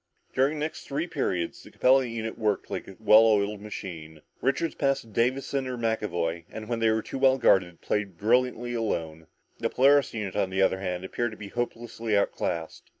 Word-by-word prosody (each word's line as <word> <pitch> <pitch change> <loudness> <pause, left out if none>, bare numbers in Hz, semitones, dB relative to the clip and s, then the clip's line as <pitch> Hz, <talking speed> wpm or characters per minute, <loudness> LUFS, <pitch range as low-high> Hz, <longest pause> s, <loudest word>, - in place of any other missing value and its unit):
During 140 +4 +2
the 150 - -1
next 160 - -7
three 145 +4 -1
periods, 95 - -2
the - - -14
Capella 130 +1 +4
unit 115 -1 -4
worked 105 -3 -1
like - - -4
a 95 - -10
well 110 +1 +7
oiled 105 -2 +2
machine. 80 -7 -8 0.2
Richards 140 +5 0
passed 135 -1 +1
to - - -17
Davison 130 +4 0
or 125 -1 -4
McAvoy, 85 -8 -1
and 110 -1 -8
when 115 0 -2
they 115 -1 +3
were 110 0 +1
too 135 - -6
well 135 0 +5
guarded, 90 -8 +3
played 100 -4 -2
brilliantly 120 +2 +1
alone. 80 -9 -3 0.3
The - - 0
Polaris 140 0 +4
unit, 105 -4 -4
on 100 -2 +1
the 95 +1 +1
other 95 0 +2
hand, 90 -1 -3
appeared 120 +5 -2
to - - -11
be 105 -1 -8
hopelessly 115 -2 -2
outclassed. 85 -4 -2
110 Hz, 195 wpm, -27 LUFS, 95-125 Hz, 0.3 s, well